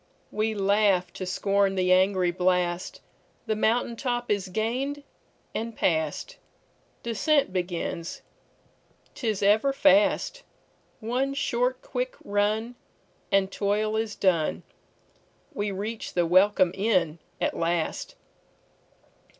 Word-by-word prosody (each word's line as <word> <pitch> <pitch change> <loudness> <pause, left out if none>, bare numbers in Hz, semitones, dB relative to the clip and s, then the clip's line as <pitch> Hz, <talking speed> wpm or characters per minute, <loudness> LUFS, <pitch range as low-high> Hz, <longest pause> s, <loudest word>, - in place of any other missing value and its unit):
We 215 +1 -1
laugh 200 -3 +2
to 185 - -6
scorn 195 +1 +1
the 185 -1 +3
angry 185 -1 +3
blast, 180 0 0 0.4
The 215 - 0
mountain 230 +2 +1
top 240 -1 -2
is 200 -2 0
gained 250 +9 -2 0.5
and 230 0 -4
past. 160 -3 -1 0.7
Descent 270 +1 +1
begins, 175 -2 -3 0.9
't 245 - -5
is 210 -2 0
ever 215 +7 +4
fast—One 275 - 0
short 250 -1 0
quick - - -3
run, 210 +3 0 0.6
and 195 -1 +2
toil 210 +2 0
is 220 -1 -2
done, 175 -5 +1 0.9
We 205 -6 -2
reach 210 +3 -5
the 175 -1 +3
welcome 185 +1 +4
inn 185 -6 +1 0.2
at - - -1
last. 175 - -2
205 Hz, 105 wpm, -26 LUFS, 185-235 Hz, 0.9 s, ever